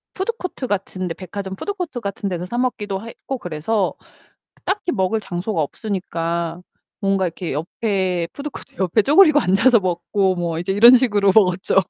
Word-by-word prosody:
푸드코트 380 - -3
같은 185 -2 -2
데 165 - -3
백화점 190 +2 -6
푸드코트 360 - -4
같은 200 0 -4
데서 180 -1 -3
사 240 +6 -4
먹기도 210 -6 -2
했고 260 +3 -6
그래서 180 +2 -1 0.7
딱히 385 -2 -1
먹을 190 +4 +1
장소가 180 -1 -3
없으니까 170 -1 -3 0.4
뭔가 195 -2 +1
이렇게 170 -1 -5
옆에 180 +2 -1
푸드코트 290 0 -8
옆에 190 +3 +2
쪼그리고 305 - +6
앉아서 225 +4 +4
먹고 185 +1 0
뭐 170 -2 -2
이제 185 +2 -1
이런 230 +5 +8
식으로 205 -6 +3
먹었죠. 185 -4 +3
195 Hz, 360 characters per minute, -21 LUFS, 180-235 Hz, 0.7 s, 이런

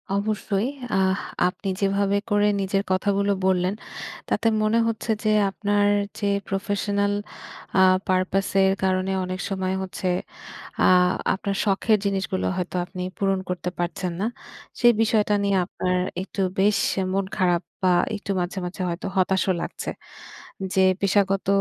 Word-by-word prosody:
অবশ্যই। 210 +1 -1 0.3
আহ 190 0 +2 0.3
আপনি 195 +2 -5
যেভাবে 200 0 +2
করে 205 0 +4
নিজের 195 +1 0
কথাগুলো 200 +1 +1
বললেন, 185 0 +2 0.6
তাতে 230 - +1
মনে 215 +2 +2
হচ্ছে 225 0 -2
যে 215 - +3 0.2
আপনার 205 +3 +1 0.3
যে 205 - -1 0.2
প্রফেশনাল 200 +1 0 0.7
আ - - +7 0.3
পারপাস 185 +1 +1
এর 190 0 +4
কারণে 185 0 +1
অনেক 185 +1 -4
সময় 190 -1 -1
হচ্ছে 185 0 -3 0.8
আ - - +6 0.5
আপনার 195 0 -3
শখের 210 +2 +3
জিনিসগুলো 195 -1 -1
হয়তো 180 0 -3
আপনি 180 0 -7 0.2
পূরণ 195 -1 +1
করতে 180 0 -2
পারছেন 175 +1 -2
না। 215 - +1 0.5
সেই 240 0 +7
বিষয়টা 215 -2 +2
নিয়ে 200 -1 +2
আপনার 180 -1 -1 0.3
একটু 195 - -6 0.2
বেশ 205 +1 +4 0.3
মন 195 0 0
খারাপ 180 -1 +2 0.2
বা 180 - +5 0.2
একটু 200 -1 -4
মাঝে, 180 +2 -3
মাঝে 185 +1 -5
হয়তো 170 +3 -4
হতাশও 190 0 +2
লাগছে। - - -4 0.8
যে 190 0 +4 0.2
পেশাগত 195 -1 +2
195 Hz, 135 wpm, -24 LUFS, 185-205 Hz, 0.8 s, আ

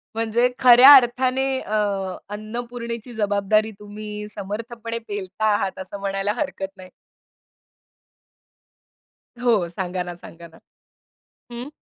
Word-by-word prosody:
म्हणजे 230 +2 +1
खऱ्या 255 +3 +9
अर्थाने 255 +1 +3
अ, 215 - -4 0.6
अन्नपूर्णेची 235 +2 -6
जबाबदारी 215 0 +1
तुम्ही 210 0 -8
समर्थपणे 230 +3 -5
पेलता 205 0 -4
आहात. 195 -2 -2
असं 190 +2 -7
म्हणायला 195 +1 -1
हरकत 220 -10 -3
नाही. 185 -1 -12 2.5
हो. 225 -8 +2
सांगा 180 +1 -3
ना, 175 0 -7
सांगा 170 0 -13
ना. 165 - -19 1.0
हं. 240 +3 -6
215 Hz, 100 wpm, -22 LUFS, 195-240 Hz, 2.5 s, खऱ्या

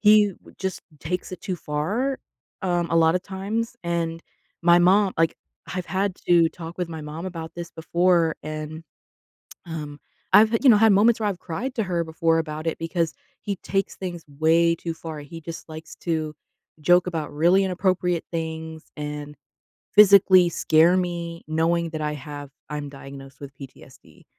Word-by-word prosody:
he 210 -1 +6
w - - -19
just 190 -1 -3 0.2
takes 180 +4 -3
it 185 - -7
too 190 - -3
far, 205 - -2 0.4
um, 175 -2 +1
a 165 - +2
lotta 165 +2 +4
times. 205 +5 -4
And 165 -1 -2 0.4
my 175 0 +6
mom 190 +2 +4
like, 165 0 +2 0.4
I've 180 -2 -3
had 195 0 -1
to 170 -2 +6
talk 165 0 -9
with 180 - -2
my 160 -2 -6
mom 150 +3 -7
about 165 -3 -6
this 170 -1 -6
before 170 0 +2
and, 155 +1 -6 0.8
um, 150 -3 -6 0.3
I've, 220 +1 +7
you - - +7
know, 215 - +7
had 225 0 +6
moments 220 +3 +4
where 210 - +1
I've 185 - -5
cried 240 +10 -4
to 225 - +1
her 175 -3 -1
before 165 0 +1
about 155 0 -4
it 160 - -3
because 165 0 -1 0.3
he 205 -1 -2
takes 195 0 -1
things 175 -3 -6 0.2
way 165 +1 +4
too 165 0 -5
far. 160 -2 -7
He 165 +3 -9
just 165 +1 -8
likes 160 0 -9
to 155 -2 -1 0.5
joke 175 +4 +4
about 160 -4 -4
really 175 +6 +4
inappropriate 180 -2 0
things 160 -1 -4
and 150 0 -6 0.6
physically 195 -3 +7
scare 165 +1 +4
me 170 -2 -3
knowing 165 +1 +1
that 155 -1 -5
I 150 0 -1
have 145 -1 -8 0.2
I'm 145 -1 -4
diagnosed 135 -1 -11
with 140 -1 -9
PTSD. 135 - -14
170 Hz, 165 wpm, -24 LUFS, 155-185 Hz, 0.8 s, I've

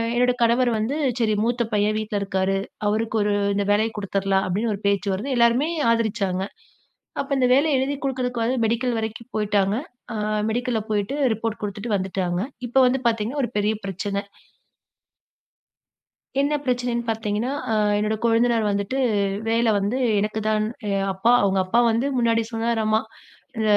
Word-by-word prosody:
என்னோட 250 +1 +3
கணவர் 235 +1 +3
வந்து, 220 +6 -1 0.2
"சரி 220 -2 +2
மூத்த 240 +1 +1
பையன் 210 +1 +2
வீட்ல 210 -1 -2
இருக்காரு, 195 0 0 0.3
அவருக்கு 220 +2 0
ஒரு 205 0 +1 0.2
இந்த 200 - +1
வேலைய 220 +2 +2
குடுத்தரலாம்" 195 -1 0
அப்டின்னு 215 +5 0
ஒரு 200 - -12
பேச்சு 200 0 +1
வருது, 210 +9 -3
எல்லாருமே 235 +6 +3 0.2
ஆதரிச்சாங்க. 210 -5 0 0.8
அப்ப 275 - -7
இந்த 255 - +3
வேலைய 285 0 +3
எழுதி 275 +2 -1
குடுக்குறதுக்கு 250 -3 -1
வந்து 255 +3 0
மெடிக்கல் 235 +1 0
வரைக்கும் 225 +2 -6
போயிட்டாங்க. 205 -1 +1 0.4
அ - - -2 0.3
மெடிக்கல்ல 240 -1 -1
போயிட்டு 210 +6 -1 0.2
ரிப்போர்ட் 225 0 -4
குடுத்துட்டு 205 +2 -2
வந்துட்டாங்க. 185 -2 -2 0.3
இப்ப 260 +3 +3
வந்து 255 +1 0
பாத்தீங்கன்னா 230 +5 0
ஒரு - - -9
பெரிய 210 +1 +1
பிரச்சன. 200 +1 -3 2.2
என்ன 285 +2 +2
பிரச்சனைன்னு 245 -2 -1
பாத்தீங்கன்னா, 220 +3 -1 0.2
அ - - +1 0.3
என்னோட 215 +1 0
கொழுந்தனாரு 230 0 +3
வந்துட்டு, 200 +6 -1 0.5
வேல 230 +1 +2
வந்து 205 +5 0 0.2
எனக்குதான் 215 +1 0 0.2
எ - - 0 0.2
அப்பா 190 +5 +1
அவங்க 195 -1 +2
அப்பா 185 +6 +1
வந்து 230 +4 +1
முன்னாடி 230 -1 +2
சொன்னாராம்மா, 225 -1 +1 0.6
அ - - +1
225 Hz, 145 wpm, -23 LUFS, 205-240 Hz, 2.2 s, என்னோட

